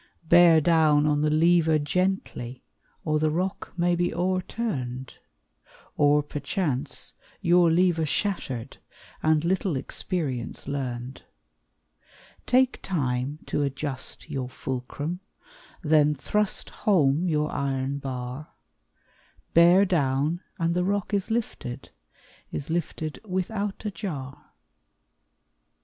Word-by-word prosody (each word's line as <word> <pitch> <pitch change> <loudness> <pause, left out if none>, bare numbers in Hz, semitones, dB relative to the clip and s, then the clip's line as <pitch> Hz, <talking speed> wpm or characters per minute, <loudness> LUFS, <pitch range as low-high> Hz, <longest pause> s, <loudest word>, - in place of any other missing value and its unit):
Bear 170 -1 +7
down 155 -2 +4
on 150 -1 +2
the 150 - +2
lever 160 0 +4
gently, 145 -6 -2 0.4
Or 155 -1 +1
the 155 0 +2
rock 180 +5 -2
may 175 0 +2
be 175 0 0
o'erturned! 175 - -2 0.8
Or, 145 0 +4
perchance, 145 -2 -3 0.3
your 175 0 +4
lever 170 -2 +3
shattered, 140 - -2 0.4
And 155 0 +2
little 185 -2 +1
experience 130 -4 -3
learned! 130 -2 -4 1.3
Take 255 +1 +3
time 140 -3 -2
to - - -1
adjust 140 -1 -3
your 130 -2 -4
fulcrum, 135 +7 -4 0.6
Then 150 -1 +4
thrust 210 +8 -1
home 165 -4 +2
your 150 -2 +1
iron 135 0 -1
bar; 130 +1 -6 1.0
Bear 175 +4 +7
down 150 -1 +1 0.2
and 165 0 +1
the 180 +1 +1
rock 200 +2 -1
is 200 +1 0
lifted, 215 - -3 0.6
Is 145 - -5
lifted 160 -2 -3
without 200 +2 -3
a 210 - -1
jar. 150 -9 -7
155 Hz, 105 wpm, -26 LUFS, 140-180 Hz, 1.3 s, Bear